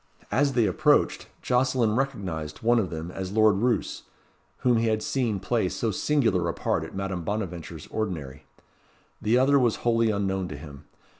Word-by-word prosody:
As 140 Hz, +5 st, +2 dB
they 120 Hz, -3 st, +3 dB
approached, 90 Hz, -5 st, +2 dB, 0.2 s
Jocelyn 125 Hz, -3 st, +2 dB
recognised 95 Hz, -, -3 dB
one 120 Hz, +1 st, +4 dB
of 95 Hz, -5 st, -1 dB
them 80 Hz, +1 st, -6 dB
as 95 Hz, 0 st, -5 dB
Lord 110 Hz, -2 st, +4 dB
Roos, 120 Hz, +3 st, 0 dB, 0.6 s
whom 125 Hz, -2 st, +3 dB
he 115 Hz, 0 st, +1 dB
had 110 Hz, -1 st, 0 dB
seen 115 Hz, -7 st, -1 dB
play 100 Hz, 0 st, 0 dB
so 115 Hz, +3 st, -2 dB
singular 100 Hz, -, +1 dB
a -, -, -3 dB
part -, -, -1 dB
at -, -, -9 dB
Madame 95 Hz, -2 st, -3 dB
Bonaventure's 85 Hz, -5 st, -4 dB
ordinary. 75 Hz, -10 st, -4 dB, 0.8 s
The 115 Hz, +3 st, +3 dB
other 140 Hz, +2 st, +4 dB
was 120 Hz, -4 st, +2 dB
wholly 115 Hz, -1 st, +3 dB
unknown 95 Hz, -3 st, -1 dB
to 70 Hz, -, -7 dB
him. 70 Hz, -2 st, -11 dB
105 Hz, 165 wpm, -26 LUFS, 90-120 Hz, 0.8 s, one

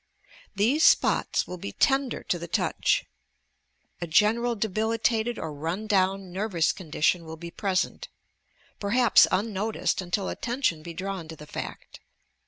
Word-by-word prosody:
These 245 Hz, -, +2 dB
spots -, -, +3 dB
will 180 Hz, -, -7 dB
be 100 Hz, -10 st, -6 dB
tender 270 Hz, -2 st, +1 dB
to 175 Hz, -, -1 dB
the 170 Hz, -, -6 dB
touch. -, -, +1 dB, 1.0 s
A 175 Hz, -, -3 dB
general 225 Hz, +8 st, +3 dB
debilitated 220 Hz, +2 st, 0 dB
or 160 Hz, -2 st, -5 dB
run 165 Hz, +8 st, -4 dB
down 195 Hz, -2 st, +1 dB
nervous 190 Hz, -4 st, +1 dB
condition 170 Hz, 0 st, 0 dB
will 160 Hz, 0 st, -8 dB
be 170 Hz, +1 st, -8 dB
present, 190 Hz, 0 st, -1 dB, 0.4 s
— -, -, -36 dB
perhaps 235 Hz, +4 st, +5 dB
unno 210 Hz, +2 st, -1 dB
ticed 215 Hz, -, -1 dB
until 185 Hz, +2 st, -2 dB
attention 240 Hz, -, -1 dB
be 170 Hz, +1 st, -9 dB
drawn 190 Hz, -2 st, -4 dB
to 160 Hz, -, -8 dB
the 150 Hz, -, -12 dB
fact. -, -, -8 dB
195 Hz, 145 wpm, -26 LUFS, 170-220 Hz, 1.0 s, perhaps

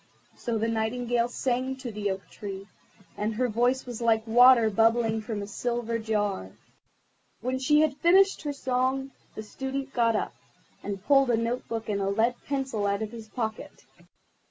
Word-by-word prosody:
So 235 Hz, -2 st, -2 dB
the 220 Hz, +1 st, 0 dB
Nightingale 235 Hz, +1 st, 0 dB
sang 255 Hz, +2 st, -1 dB
to 260 Hz, -2 st, -7 dB
the 205 Hz, -1 st, -2 dB
Oak 190 Hz, 0 st, -4 dB
tree, 195 Hz, -1 st, -7 dB, 0.5 s
and 215 Hz, +1 st, -2 dB
her 250 Hz, +3 st, +1 dB
voice 245 Hz, +3 st, +1 dB
was 245 Hz, -2 st, -7 dB
like 225 Hz, -1 st, +2 dB
water 235 Hz, -1 st, +6 dB
bubbling 225 Hz, +1 st, +2 dB
from 215 Hz, -2 st, -4 dB
a -, -, -7 dB
silver 235 Hz, +1 st, -2 dB
jar. 205 Hz, -, -2 dB, 0.9 s
When 255 Hz, +3 st, -2 dB
she 295 Hz, +3 st, +4 dB
had 300 Hz, -3 st, +1 dB
finished 385 Hz, +3 st, +4 dB
her 295 Hz, -, -3 dB
song 265 Hz, 0 st, -1 dB, 0.2 s
the 215 Hz, -, -6 dB
Student 270 Hz, +4 st, -5 dB
got 230 Hz, -2 st, +2 dB
up, -, -, -2 dB, 0.5 s
and 200 Hz, -1 st, -6 dB
pulled 275 Hz, -2 st, +4 dB
a 235 Hz, -, +3 dB
note 235 Hz, +2 st, -2 dB
book 225 Hz, -1 st, -4 dB
and 200 Hz, -2 st, -1 dB
a 195 Hz, -, 0 dB
lead 225 Hz, +4 st, +2 dB
pencil 265 Hz, -7 st, -1 dB
out 200 Hz, +2 st, 0 dB
of 215 Hz, -, -5 dB
his 225 Hz, -2 st, -10 dB
pocket. 220 Hz, -2 st, -5 dB
230 Hz, 175 wpm, -27 LUFS, 215-255 Hz, 0.9 s, water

